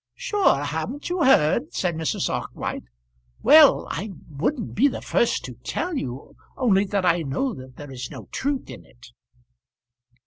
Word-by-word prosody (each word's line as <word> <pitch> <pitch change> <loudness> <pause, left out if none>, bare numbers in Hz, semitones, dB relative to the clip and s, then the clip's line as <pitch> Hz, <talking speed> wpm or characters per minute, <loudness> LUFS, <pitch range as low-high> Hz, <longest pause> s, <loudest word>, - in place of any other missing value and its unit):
"Sure, 415 - +2
haven't 160 - -4
you 355 -2 +1
heard?" 265 - +3
said 180 -2 0
Mrs. 160 0 -1
Arkwright. - - -4 0.6
"Well, 305 -2 +7
I 210 - -4 0.2
wouldn't 220 - -2
be 260 +8 +4
the 275 - -3
first 235 - 0
to 125 - -7
tell 345 +2 -3
you, 130 - -5 0.2
only 205 -6 +3
that 195 -1 -1
I 175 -1 +3
know 195 - -2
that 130 -6 -11
there 145 0 -10
is 130 -1 -6
no - - -9
truth 275 -1 -2
in - - -10
it." 120 0 -18
200 Hz, 160 wpm, -24 LUFS, -, 0.6 s, Well